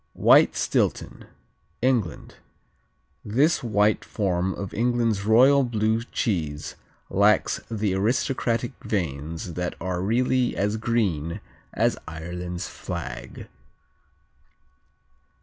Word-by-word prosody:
White - - +6
Stilton - - -1 0.6
England 120 - -1 0.9
This 140 +11 +2
white 105 -2 +2
form 95 -3 -1
of 100 -2 -6
England's 115 -3 0
royal 130 +6 +6
blue 110 -2 0
cheese 80 - -2 0.4
lacks 100 +2 +3
the 105 -3 -1
aristocratic 120 +3 0
veins 80 -2 -3
that 90 +1 -3
are 90 0 -2
really 125 +5 +1
as 105 +2 0
green 100 -9 -1 0.3
as - - +1
Ireland's 90 +2 -5
flag. - - -7
105 Hz, 90 wpm, -25 LUFS, 90-115 Hz, 0.9 s, White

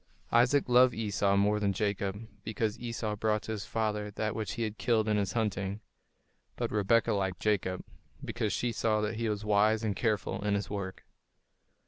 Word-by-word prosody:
Isaac 125 +4 +4
loved 125 0 +5
Esau 100 -2 +1
more 105 +1 +3
than 100 -1 +1
Jacob, 100 +1 -2 0.2
because 110 0 -2
Esau 115 -3 -3
brought 105 0 0
to - - -5
his 105 -3 -4
father 105 -2 -1
that 110 +1 -2
which 110 -4 -3
he 115 - -2
had 110 -1 -4
killed 110 0 +2
in 105 - +2
his 100 -3 -1
hunting; 100 -3 -1 0.8
but - - -2
Rebekah 105 +2 +3
liked 95 -3 -1
Jacob, 95 -3 0 0.4
because 110 -3 -1
she 120 - 0
saw 110 -1 +1
that 105 +1 -2
he 115 -1 -1
was 105 0 -3
wise 105 +1 +3
and 105 -3 0
careful 105 -2 -1
in 105 -1 +1
his 100 -1 -3
work. 95 -2 -5
105 Hz, 180 wpm, -30 LUFS, 100-110 Hz, 0.8 s, loved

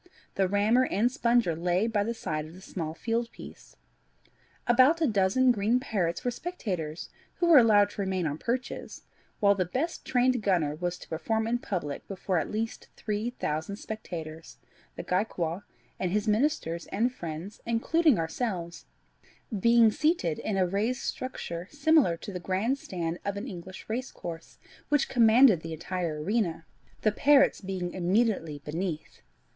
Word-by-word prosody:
The 190 -1 +1
rammer 210 +6 +3
and 225 +6 +1
sponger 235 - +2
lay 175 +4 +1
by 220 -3 +1
the 230 +3 -3
side 155 -7 -3
of 160 - -13
the 185 - -13
small 165 -4 -5
field 230 +6 -2
piece. - - -13 0.9
About 255 +7 +5
a 325 - +3
dozen 220 +3 +3
green 225 +2 +2
parrots 195 -9 -2
were 245 - +1
spectators, 190 - -4 0.3
who 350 - 0
were 325 -5 +9
allowed 205 -3 +5
to 205 - -5
remain 190 -2 -1
on 150 0 -2
perches, 250 +2 -4 0.4
while 200 -1 +5
the 195 -2 0
best 265 - -3
trained 250 -1 +2
gunner 175 -8 +1
was 175 +3 -3
to - - -13
perform 220 +8 -1
in 240 +2 0
public 170 -11 -4
before 190 -2 -1
at 145 - -3
least 225 +1 -4
three 215 +2 -2
thousand 160 -5 -3
spectators, 165 -7 -7 0.4
the - - -6
Gaekwar, 180 -1 -1 0.3
and 185 - 0
his 210 +2 0
ministers, 210 - 0
and 235 +5 0
friends, 170 +1 -7
including 280 +5 +3
ourselves, 170 0 -3 0.7
being 230 +1 +5
seated 300 - +1
in 205 -3 -2
a 185 - +3
raised 215 +8 -1
structure 180 -9 -5
similar 290 - +3
to 200 - -8
the 180 - -4
grand 200 +10 -1
stand 170 -5 -4
of 200 0 -3
an 215 +6 -5
English 185 -3 -9
racecourse, 220 -8 -6 0.3
which 295 -2 +2
commanded 230 -5 +6
the 165 0 -6
entire 165 -2 -3
arena, 180 -4 -1 0.4
the 215 - +4
parrots 280 +5 +4
being 185 -2 -4
immediately 185 -4 +1
beneath. 160 0 -4
200 Hz, 155 wpm, -28 LUFS, 170-235 Hz, 0.9 s, were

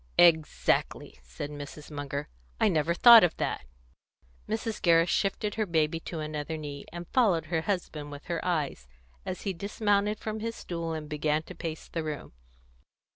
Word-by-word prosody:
"Exactly," 160 - +3
said 105 - -7
Mrs. 145 +1 -9
Munger. 145 -1 -4 0.3
"I - - +4
never 165 -1 +1
thought 235 +2 +10
of 175 - +2
that." - - -2 0.8
Mrs. 220 0 -2
Gerrish 165 0 +4
shifted 205 +1 0
her 215 -2 -1
baby 160 -1 +1
to 165 0 -6
another 155 +1 -4
knee, 145 -2 -7
and 175 0 -7
followed 195 - +3
her 160 - +2
husband 160 -6 -3
with 145 0 -9
her 170 -1 -3
eyes, 150 - -1 0.4
as 180 - -4
he 195 - -1
dismounted 205 +2 0
from 215 0 -4
his 230 +1 -3
stool 170 -2 -4
and 155 -1 -5
began 150 0 0
to - - -10
pace 160 -1 -6
the 165 - -3
room. 155 - -5
165 Hz, 165 wpm, -29 LUFS, 150-195 Hz, 0.8 s, thought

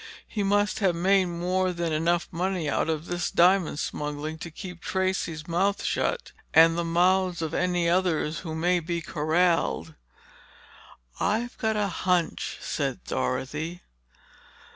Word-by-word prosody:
He 210 - -3
must 205 +1 +1
have 190 -5 +2
made 190 +2 +3
more 180 +2 0
than 170 -2 -2
enough 170 +3 +1
money 180 -1 -1
out 145 - 0
of 160 0 -2
this 175 0 -2
diamond 180 -3 +3
smuggling 150 +2 -4
to 170 - -6
keep 180 +1 -9
Tracey's 185 -4 -2
mouth 190 +4 +1
shut—and 165 - +2
the 170 - 0
mouths 180 +1 +2
of 160 0 -3
any 180 -1 +1
others 170 -3 +1
who 160 -3 -6
may 175 +2 +2
be 170 +1 -3
corralled." 160 - +1 1.3
"I've 235 +4 0
got 220 -1 0
a 210 -1 +1
hunch," 180 -2 -1
said - - -3
Dorothy. 155 - -3
175 Hz, 135 wpm, -26 LUFS, 160-185 Hz, 1.3 s, made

